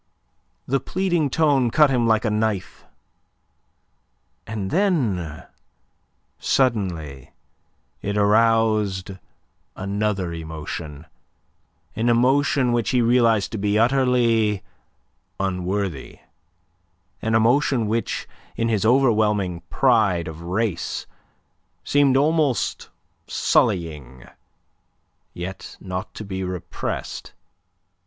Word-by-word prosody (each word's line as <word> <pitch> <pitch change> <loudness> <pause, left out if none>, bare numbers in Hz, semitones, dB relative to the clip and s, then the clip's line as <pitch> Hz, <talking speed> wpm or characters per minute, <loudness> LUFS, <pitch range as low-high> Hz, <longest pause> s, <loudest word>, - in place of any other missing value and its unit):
The 135 +1 +1
pleading 175 -1 0
tone 140 -4 +2
cut 150 +3 +4
him 120 -3 +2
like 110 0 +2
a 110 - +1
knife; 105 -3 -2 1.6
and 105 -3 -4
then 115 - 0 0.9
suddenly 90 - -1 0.7
it 100 +1 -2
aroused 105 -2 +2 0.6
another 100 -2 -2
emotion 80 -1 -7 0.9
an 115 +2 +1
emotion 130 +2 +3
which 120 -3 0
he 125 - +2
realized 115 -3 +3
to 110 - -4
be 105 +1 +1
utterly 115 -4 +2 0.8
unworthy, 95 -4 -3 1.0
an 110 0 0
emotion 120 +1 +3
which, 115 +2 -2 0.3
in 115 0 0
his 105 -4 +1
overwhelming 105 -7 +2
pride 105 -10 +2
of 80 0 -8
race, 90 0 -2 0.8
seemed 140 -2 +3
almost 145 -5 +1 0.4
sullying, 75 -7 0 1.1
yet 90 +2 -7
not 90 -1 -5
to 110 - -7
be 95 -1 -4
repressed. 90 -1 -5
110 Hz, 90 wpm, -22 LUFS, 95-125 Hz, 1.6 s, cut